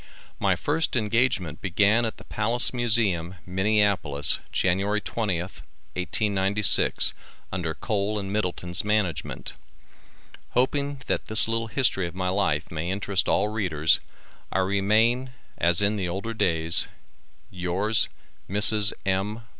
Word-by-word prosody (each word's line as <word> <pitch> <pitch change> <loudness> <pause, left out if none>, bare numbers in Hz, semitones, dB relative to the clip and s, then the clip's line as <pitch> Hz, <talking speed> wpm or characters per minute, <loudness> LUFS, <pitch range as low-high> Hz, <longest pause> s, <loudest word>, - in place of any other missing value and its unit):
My - - +2
first 160 0 -1
engagement 110 -8 0
began 100 +5 +2
at 110 - -4
the - - -13
Palace 115 +5 -1
Museum, 105 -8 0
Minneapolis, 95 -6 +1
January 100 +3 0
20th, 95 -4 -4 0.3
1896, 100 +2 +2 0.4
under 85 -4 -3
Kohl 105 +1 -2
and 100 -1 -4
Middleton's 90 -4 -2
management. 100 - -2 1.0
Hoping 140 +2 0
that - - -2
this 110 +1 +6
little 115 0 -1
history 110 -7 +1
of 85 - -10
my 90 0 -2
life 90 -5 -1
may 80 +2 -4
interest 95 0 0
all 105 - +2
readers, 90 -8 +1 0.5
I - - -1
remain 110 +7 +1 0.3
as 85 +4 +2
in 105 +1 +1
the 90 -3 -2
older 100 +6 -4
days, 80 -6 +1 0.6
Yours, 95 +5 0 0.4
Mrs. 105 +2 +6
M. 100 +4 -1
100 Hz, 120 wpm, -25 LUFS, 90-110 Hz, 1.0 s, this